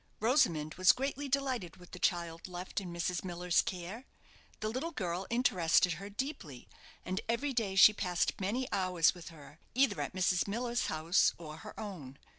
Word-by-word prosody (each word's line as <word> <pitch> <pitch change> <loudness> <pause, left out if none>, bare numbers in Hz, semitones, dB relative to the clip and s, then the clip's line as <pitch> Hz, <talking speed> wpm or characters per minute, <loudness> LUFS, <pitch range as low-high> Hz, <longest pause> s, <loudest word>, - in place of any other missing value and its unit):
Rosamond 170 - +2
was 185 - +8
greatly 275 +1 -3
delighted 255 -10 -1
with 180 0 -16
the 180 - -8
child 170 -1 -1
left 180 +2 -5
in 180 -2 -7
Mrs. 170 0 -2
Miller's 175 -1 +1
care. 190 +7 -6 0.5
The 215 - -2
little 260 +9 -3
girl 185 - -3
interested 185 -8 +3
her 200 - -7
deeply, 205 - -6 0.4
and 185 +3 -2
every 265 +5 0
day 215 -6 -1
she 200 +2 +9
passed 180 -2 -1
many 240 +7 -1
hours 180 -4 +3
with 175 -2 -10
her, 155 -1 -14 0.2
either 255 -6 +3
at - - -4
Mrs. 180 0 +2
Miller's 235 +3 -1
house 160 +4 +2
or 155 -2 -9
her - - -10
own. 155 -11 -7
185 Hz, 170 wpm, -32 LUFS, 170-235 Hz, 0.5 s, she